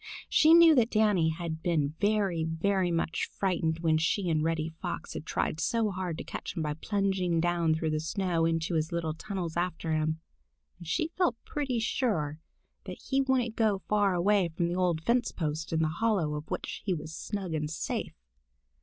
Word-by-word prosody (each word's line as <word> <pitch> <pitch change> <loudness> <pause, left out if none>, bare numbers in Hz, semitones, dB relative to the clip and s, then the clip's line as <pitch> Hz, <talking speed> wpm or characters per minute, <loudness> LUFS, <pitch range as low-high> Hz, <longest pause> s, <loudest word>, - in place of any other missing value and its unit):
She 315 +2 +6
knew 335 -1 +8
that 240 -5 +3
Danny 210 -8 +3
had 160 -1 -4
been 155 -4 0
very, 200 -5 +1
very 180 +3 0
much 165 -1 -1
frightened 165 -4 -1
when 160 -2 +3
she 175 +3 +1
and 155 -1 +1
Reddy 160 -1 0
Fox 175 - -4
had 155 - -7
tried 155 - -1
so 225 +3 +1
hard 180 -3 -3
to - - -5
catch - - -6
him 160 - 0
by 150 -1 -1
plunging 190 0 0
down 170 -1 +2
through 160 0 -1
the 155 - 0
snow 170 +1 -1
into 165 +1 0
his 160 -1 0
little 165 -2 -1
tunnels 170 0 -5
after 175 -2 -1
him, 155 0 0 0.6
and 170 - -10
she 315 - 0
felt 350 -10 +3
pretty 275 -5 -2
sure 170 - -1 0.5
that - - -7
he 270 0 +3
wouldn't 255 -4 +1
go 210 -4 +1
far 205 -3 +2
away 190 +1 +3
from 170 +1 -1
the 175 - -2
old 175 -3 +1
fence 240 +4 +2
post, 155 -1 -3
in 160 0 +1
the - - +2
hollow 175 -2 0
of 150 +1 -6
which - - -4
he 190 -3 0
was 155 0 -7
snug 190 0 -4
and 150 -1 -1
safe. 160 - -3
175 Hz, 190 wpm, -29 LUFS, 160-205 Hz, 0.6 s, knew